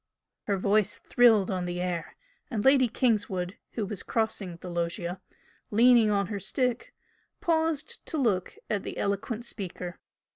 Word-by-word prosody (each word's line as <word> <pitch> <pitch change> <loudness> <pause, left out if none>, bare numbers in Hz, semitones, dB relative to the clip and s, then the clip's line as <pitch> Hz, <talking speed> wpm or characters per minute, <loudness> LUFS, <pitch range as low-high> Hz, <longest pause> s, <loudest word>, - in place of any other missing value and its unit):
Her 200 -4 +1
voice 205 +2 +2
thrilled 225 -6 +4
on 185 -1 -1
the 175 0 -3
air, 180 -2 -3 0.3
and 215 -4 -2
Lady 265 -2 +6
Kingswood, 205 -6 0 0.2
who 220 - -2
was 200 -1 -5
crossing 215 -5 -2
the 180 - -10
loggia, 175 +1 -3 0.5
leaning 235 0 +6
on 200 -1 +2
her 200 +1 -4
stick, 250 +4 -1 0.5
paused 320 -2 0
to 320 - -2
look 215 -10 0
at 205 -2 -1
the - - -6
eloquent 220 +4 -2
speaker. 180 -5 -6
205 Hz, 145 wpm, -28 LUFS, 185-240 Hz, 0.5 s, Lady